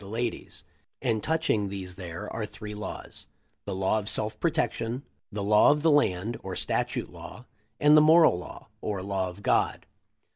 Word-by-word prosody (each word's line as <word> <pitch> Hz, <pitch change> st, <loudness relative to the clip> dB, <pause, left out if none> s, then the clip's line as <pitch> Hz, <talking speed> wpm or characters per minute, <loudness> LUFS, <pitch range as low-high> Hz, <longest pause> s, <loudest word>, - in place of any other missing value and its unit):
The 100 Hz, -, -11 dB
Ladies; 115 Hz, +3 st, -4 dB, 0.4 s
and 115 Hz, -5 st, 0 dB
touching 155 Hz, -11 st, 0 dB
these 95 Hz, -2 st, -6 dB
there 85 Hz, -2 st, -7 dB
are 110 Hz, -2 st, -3 dB
three 105 Hz, 0 st, -8 dB
laws: 105 Hz, +1 st, -7 dB, 0.4 s
The -, -, -3 dB
Law 95 Hz, +3 st, +1 dB
of 105 Hz, 0 st, -5 dB
sel -, -, +1 dB
f 110 Hz, 0 st, -20 dB
protection; 120 Hz, +4 st, -1 dB, 0.3 s
the 105 Hz, -1 st, -3 dB
law 105 Hz, +1 st, +5 dB
of 150 Hz, +1 st, +2 dB
the 165 Hz, -, +5 dB
land, 115 Hz, -6 st, +2 dB
or -, -, -5 dB
statute -, -, -1 dB
law; -, -, -10 dB, 0.3 s
and 150 Hz, +1 st, +6 dB
the 155 Hz, -, +8 dB
moral 160 Hz, -, +6 dB
law, 90 Hz, -, -11 dB
or 100 Hz, -3 st, -3 dB
law 95 Hz, -1 st, -1 dB
of 90 Hz, +3 st, -12 dB
God. -, -, +1 dB
105 Hz, 180 wpm, -27 LUFS, 95-125 Hz, 0.4 s, the